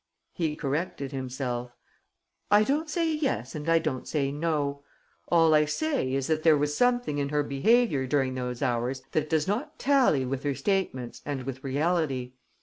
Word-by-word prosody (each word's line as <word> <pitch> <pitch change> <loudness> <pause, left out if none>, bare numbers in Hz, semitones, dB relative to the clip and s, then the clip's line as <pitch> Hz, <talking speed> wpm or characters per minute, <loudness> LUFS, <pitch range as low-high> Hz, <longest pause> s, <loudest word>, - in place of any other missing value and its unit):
He 160 -3 -1
corrected 140 -1 -3
himself: 125 -2 -4 0.7
"I 205 +1 +6
don't 300 +7 0
say 325 0 0
yes 270 - -1
and 150 +1 -4
I 165 - +5
don't 155 -6 -2
say 140 -3 0
no. 145 -2 -1 0.5
All 165 -2 +4
I 150 0 +5
say 205 - -1
is 135 -1 -1
that 155 +1 0
there 155 -2 +5
was 145 +1 0
something 245 -10 +1
in 140 0 -1
her 150 0 +1
behaviour 145 - +2
during 135 -1 +1
those 125 0 -4
hours 125 +1 -1
that 155 -1 0
does 160 0 +1
not 215 +9 -2
tally 255 - +3
with 130 +1 -3
her 140 -1 -1
statements 185 - -2
and 140 -3 -4
with 135 0 -6
reality. 140 -3 0
145 Hz, 170 wpm, -27 LUFS, 130-170 Hz, 0.7 s, I